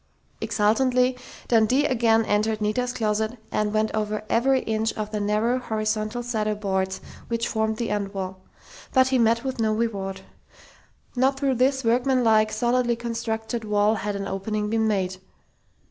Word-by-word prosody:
Exultantly, 250 +4 +2 0.3
Dundee 240 +5 +3
again 230 -5 +3
entered 215 +1 +1
Nita's 220 +4 0
closet 220 0 -1
and 210 0 0
went 215 0 +1
over 215 0 -2
every 260 +3 +3
inch 220 0 -1
of 215 -1 -5
the 210 - -2
narrow, 215 +5 +1
horizontal 215 0 -2
cedar 215 -3 -1
boards, 190 -2 -2 0.3
which 230 0 -1
formed 220 -1 -1
the 235 -2 -2
end 200 -1 -2
wall. 190 -1 -5 0.5
But 260 -1 +4
he 260 -1 +2
met 230 0 +3
with 265 -2 -4
no 220 -1 +2
reward. 200 -4 -2 0.9
Not 265 +2 +2
through 275 -2 +1
this 265 +1 +2
workmanlike, 230 -2 +3
solidly 240 +1 +1
constructed 230 0 -3
wall 210 0 +2
had 205 -1 -3
an 195 0 -4
opening 210 +2 -2
been 225 -1 +2
made.... 190 -3 -1
220 Hz, 150 wpm, -24 LUFS, 210-240 Hz, 0.9 s, But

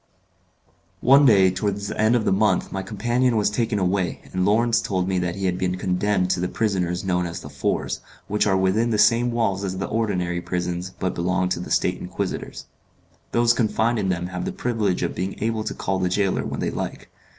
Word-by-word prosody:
One 140 +2 +6
day 95 -5 +6
towards 100 +1 -2
the - - -3
end 110 +2 +4
of 115 -3 +1
the - - +2
month 105 +3 +2
my 95 - -3
companion 120 +5 0
was 105 -1 +2
taken 115 -1 0
away, 95 -1 0
and 90 0 0
Lawrence 115 +4 +3
told 95 -2 -1
me 95 -1 0
that 90 -1 -2
he 100 - -3
had 90 0 0
been 90 -1 -1
condemned 90 0 0
to 90 - 0
the 90 - 0
prisons 90 -5 -1
known 90 -2 0
as 85 - -6
The - - -10
Fours, - - -2 0.3
which 105 +1 +1
are 95 -2 +3
within 95 +5 +2
the 110 - +1
same 120 +3 +4
walls 105 -5 0
as 95 -1 -3
the 95 - -2
ordinary 90 -6 -1
prisons, 90 0 -3
but 95 - -1
belong 90 +1 0
to 90 - -1
the 90 - -6
State - - +1
Inquisitors. - - -5 0.7
Those 120 0 +4
confined 115 0 +1
in 95 -2 -1
them 90 -1 -1
have 90 0 -4
the - - -2
privilege 110 -6 -1
of - - -1
being 95 +2 -3
able 110 0 -1
to - - -3
call 95 0 -2
the 90 -1 +1
gaoler 95 +1 0
when - - -4
they - - -1
like. - - -5
95 Hz, 215 wpm, -23 LUFS, 90-110 Hz, 0.7 s, One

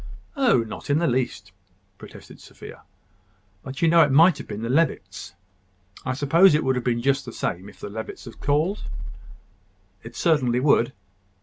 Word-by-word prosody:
"Oh! 255 - +3
not 110 - -9
in 145 - +3
the 170 - +1
least," 120 - -2 0.5
protested - - -13
Sophia. - - -13 0.8
"But 135 - -7
you - - +5
know 165 +1 +5
it 150 - +4
might 165 +6 +5
have - - -9
been 105 +2 -6
the - - -2
Levitts. 100 - -1 0.7
I 130 - -2
suppose 155 +5 +4
it 155 - +1
would 130 - +1
have 125 - -3
been 120 -1 -1
just 135 0 +1
the 120 - -8
same 95 -2 -4
if - - -18
the - - -7
Levitts 110 +2 -8
had 120 - -12
called?" 155 +8 0 1.2
"It 115 +1 -12
certainly 130 -8 +1
would." 125 -3 +2
130 Hz, 175 wpm, -23 LUFS, 115-160 Hz, 1.2 s, you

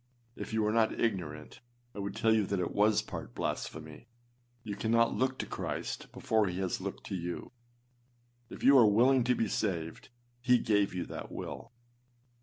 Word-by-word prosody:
If - - -7
you 110 0 +1
were 105 - +2
not 115 0 +2
ignorant, 85 -9 -3 0.3
I - - -8
would 100 0 -4
tell 110 0 +3
you 110 -3 +2
that 100 -1 -1
it 90 - -1
was 105 +1 +3
part - - -8
blasphemy. 80 +7 -5 0.6
You 105 -3 -4
cannot 115 +3 +2
look 130 0 0
to - - -3
Christ - - -4
before 110 -5 +1
he 90 0 -3
has 95 -1 -2
looked - - -5
to - - -2
you. 85 -1 -5 1.0
If - - -10
you 140 - +7
are 115 - +7
willing 125 +5 +4
to 125 0 +3
be 115 - 0
saved, 85 -6 -3 0.3
he 125 0 +5
gave 105 -4 +1
you 90 - -2
that - - -7
will. 115 - -7
105 Hz, 180 wpm, -31 LUFS, 95-115 Hz, 1.0 s, you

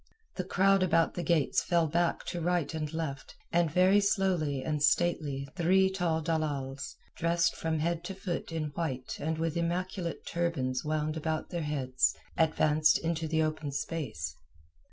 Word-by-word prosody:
The 185 - -2
crowd 195 +1 +3
about 165 -3 +3
the 175 - -3
gates 160 -3 +2
fell 170 -2 +2
back 170 +2 0
to 175 - -4
right 175 -2 0
and 155 -2 -3
left, 155 -4 -5 0.2
and 170 -1 +3
very 185 +5 +5
slowly 180 -9 +1
and 150 -2 -1
stately 145 -3 +1
three 190 +2 +3
tall 170 -4 0
dalals, 145 -4 -2 0.2
dressed 170 +1 +2
from 160 -1 -1
head 170 +2 -1
to 195 - -5
foot 185 -3 -4
in 160 -2 -2
white 135 -5 -3
and 160 +1 -2
with 165 0 -1
immaculate 170 +1 -2
turbans 140 -7 -1
wound 155 0 -1
about 160 0 -2
their 175 - -2
heads, 135 -4 +1 0.2
advanced 155 -1 +3
into 165 -1 -2
the 160 0 +2
open 155 -2 -2
space. 135 - -4
160 Hz, 155 wpm, -30 LUFS, 150-175 Hz, 0.2 s, very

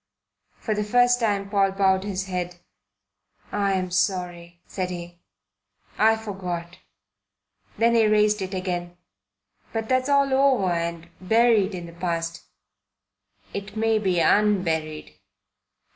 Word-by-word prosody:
For 220 - -2
the 210 0 -1
first 245 +3 +3
time 205 -4 0
Paul 195 -1 +1
bowed 190 -1 +2
his 195 -2 -3
head. 180 -2 -4 1.0
"I'm 190 -2 0
sorry," 175 -2 -2
said 185 -2 -4
he. 175 -1 -8 0.8
"I 220 +1 +5
forgot." 180 -5 -6 1.0
Then 230 +1 +3
he 225 -2 +4
raised 210 0 +3
it 190 0 -4
again. 175 -1 -4 0.7
"But 225 -1 -4
that's 255 +1 +1
all 280 -1 +3
over 265 -9 +3
and 170 0 -3
buried 220 -1 +3
in 175 -1 -6
the 170 - -11
past." 170 -1 -3 1.1
"It 200 +1 -6
may 225 0 +2
be 185 -4 +1
unburied." 165 -7 +1
195 Hz, 120 wpm, -24 LUFS, 175-215 Hz, 1.1 s, I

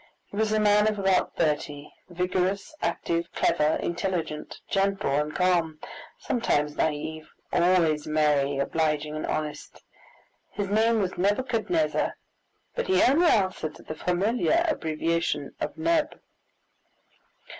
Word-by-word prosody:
He - - -9
was 215 +1 +1
a 215 - +2
man 210 0 +4
of 215 -1 0
about 195 -2 +1
thirty, 150 -2 -2 0.2
vigorous, 180 - -1
active, 170 0 -1
clever, 155 -2 +2
intelligent, 170 -3 -3
gentle, 195 -4 0
and 150 +2 0
calm, 175 -4 +1 0.4
sometimes 150 -11 0
naive, 155 +1 -2 0.2
always 170 -4 +3
merry, 150 -2 +2
obliging, 150 +1 0
and 155 - -3
honest. 150 -1 -4 0.7
His 200 -2 -4
name 220 +2 +3
was 185 -1 -4
Nebuchadnezzar, 245 - 0 0.6
but 485 - -3
he 375 0 +4
only 320 +7 +4
answered 185 - +1
to - - -14
the - - -6
familiar 210 - +1
abbreviation 165 - -1
of - - -4
Neb. 320 -1 0
180 Hz, 120 wpm, -26 LUFS, 155-210 Hz, 0.7 s, man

